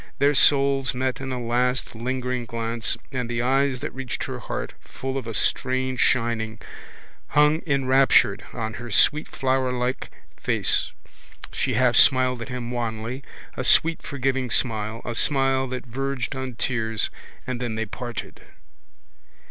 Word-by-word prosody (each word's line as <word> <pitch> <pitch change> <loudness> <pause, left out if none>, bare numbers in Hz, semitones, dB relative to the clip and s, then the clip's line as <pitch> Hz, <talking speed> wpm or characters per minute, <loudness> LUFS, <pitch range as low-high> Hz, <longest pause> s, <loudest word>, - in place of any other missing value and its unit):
Their 145 +1 +3
souls 135 -2 +4
met 130 0 -1
in 135 -1 -4
a 125 - -3
last 125 +1 0
lingering 125 +1 -3
glance 115 0 -2
and 125 -3 -3
the 120 0 -1
eyes 135 0 +1
that - - -4
reached 135 -2 -4
her - - -5
heart, - - -5
full 135 0 -6
of 130 -4 -3
a 115 - -4
strange 130 +1 +1
shining, 115 -3 +1 0.7
hung 150 +2 +3
enraptured 135 -1 +4
on 110 0 -4
her 120 - -7
sweet 150 +7 +4
flowerlike 130 -1 -1 0.3
face. - - +1 0.6
She 130 -3 -1
half 125 0 +3
smiled 130 -1 +5
at 115 - -6
him 125 -1 -5
wanly, 120 +1 -3 0.3
a 130 - -3
sweet 165 +5 +4
forgiving 135 -2 -1
smile, 110 -2 -1
a 120 - -3
smile 135 +1 +1
that 130 0 -5
verged 135 +1 -3
on 130 -2 -5
tears, 110 -3 0 0.3
and 125 -1 -4
then 120 -3 -2
they 110 0 -2
parted. 110 -2 -7
125 Hz, 145 wpm, -24 LUFS, 120-135 Hz, 0.7 s, smiled